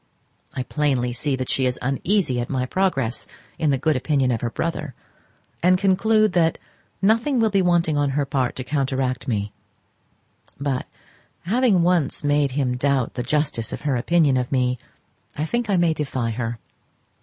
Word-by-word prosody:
I 130 - -2
see - - -2
plainly 135 -4 0
that 130 +1 -2
she 130 -1 +1
is 125 - -2
uneasy 135 +1 0
at 120 - -5
my 130 -2 -1
progress 135 -7 -1 0.3
in 155 - +2
the 135 - +2
good 150 +3 +1
opinion 130 -1 +1
of 115 - -1
her 120 - -1
brother, 155 0 -3 0.7
and 185 +1 +4
conclude 215 +3 +3
that 165 -2 +2 0.5
nothing 230 +6 +3
will 220 -2 +2
be 195 -1 +3
wanting 170 -4 +2
on 145 -1 +2
her 145 - +1
part 135 -2 -1
to 130 - -4
counteract 130 -2 -1
me; 105 -4 -2 1.1
but 140 -2 -2 0.5
having 215 -2 +2
once 170 -6 +1
made 145 -1 +2
him 130 -3 0
doubt 135 -2 +1
the 125 - -3
justice 130 -4 -1
of - - -5
her 140 -2 0
opinion 145 +1 +3
of 125 -1 -2
me, 125 -2 +1 0.6
I 150 - -1
think 240 +6 -2
I 195 - +3
may 170 -2 +3
defy 130 -6 -2
her. 115 0 -3
140 Hz, 170 wpm, -23 LUFS, 125-175 Hz, 1.1 s, and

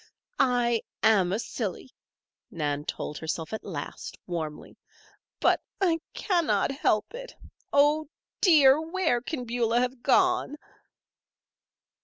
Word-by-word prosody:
"I 245 -3 +2 0.2
am 200 -5 +4
a 200 - +1
silly," 225 0 -5 0.6
Nan 145 -2 -3
told 150 - -5
herself 160 +2 -4
at 220 - -4
last, 160 -8 -7
warmly. 160 -4 -6 0.6
"But - - +3 0.2
I 345 -4 +2 0.2
cannot 345 -7 +1
help 270 - 0
it. - - -9 0.4
Oh, 295 +2 +3 0.3
dear! 300 -6 +6
Where 320 -7 0
can 255 -1 -5
Beulah 235 0 +1
have 250 0 -2
gone?" 365 0 +2
245 Hz, 110 wpm, -27 LUFS, 200-310 Hz, 0.6 s, dear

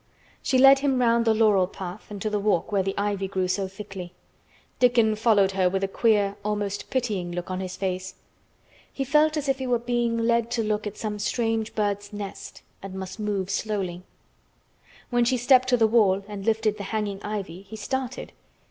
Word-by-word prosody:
She 260 - +1
led 270 +1 +8
him 270 -2 +1
round 235 -1 +3
the 225 - +4
laurel 210 -4 +4
path 185 +1 -8
and 205 -1 -7
to 215 - 0
the 210 - 0
walk 200 -4 0
where 200 -2 +2
the 195 +1 -3
ivy 200 -1 -1
grew 190 -1 -1
so 190 +1 -1
thickly. 190 -2 -9 0.7
Dickon 235 -3 +4
followed 210 -3 +3
her 190 -1 +2
with 195 +1 -1
a - - +2
queer, 205 -1 +2
almost 205 -1 -3
pitying, 210 -9 -1
look 175 +1 -5
on 185 - -2
his 185 -1 -5
face. 185 0 -3 0.8
He 270 - -3
felt 305 +3 +3
as 290 -2 -2
if 270 0 +1
he 260 - -3
were 245 -1 +2
being 240 -1 -1
led 230 0 +1
to 230 - 0
look 210 0 -1
at 210 - -7
some 210 -1 -4
strange 225 0 -1
bird's 205 -1 -1
nest 205 -2 -8 0.2
and 195 -1 -8
must 190 +2 -7
move 200 -3 -2
softly. 195 -4 -2 1.1
When 240 0 +3
she 250 +2 +2
stepped 255 +1 +4
to 250 -1 +3
the 225 - +4
wall 200 -4 +3
and 205 -1 -7
lifted 220 -1 +1
the 200 - -5
hanging 205 -3 -2
ivy 195 -4 -5
he 200 +2 -11
started. 260 +4 -4
210 Hz, 195 wpm, -25 LUFS, 195-235 Hz, 1.1 s, led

